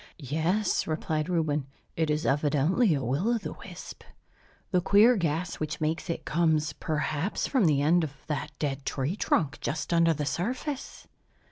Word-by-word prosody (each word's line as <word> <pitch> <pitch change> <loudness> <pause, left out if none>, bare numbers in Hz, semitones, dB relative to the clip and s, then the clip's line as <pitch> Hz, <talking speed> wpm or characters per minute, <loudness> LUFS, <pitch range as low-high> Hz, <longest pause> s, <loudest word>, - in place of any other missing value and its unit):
"Yes," 165 +8 0
replied 155 0 -1
Reuben, 155 -5 0 0.3
"it 160 -1 0
is 150 +2 0
evidently 150 - +2
a 135 - -2
will 165 - +1
o' - - +1
the 215 - -6
wisp. - - -10 0.7
The 180 -3 +3
queer 210 +7 +6
gas, 170 -2 -1
which 155 0 -3
makes 160 +3 -2
it, 170 - -3
comes 155 -2 +1
perhaps 155 +5 -2
from 260 -8 +2
the 145 -3 +3
end 170 +3 +4
of 145 -2 -7
that 150 0 -3
dead 140 -2 -2
tree 135 +6 -2
trunk, 160 -8 0
just 160 +3 -2
under 165 -1 +4
the 150 0 -2
surface." 255 - -4
160 Hz, 160 wpm, -28 LUFS, 150-180 Hz, 0.7 s, queer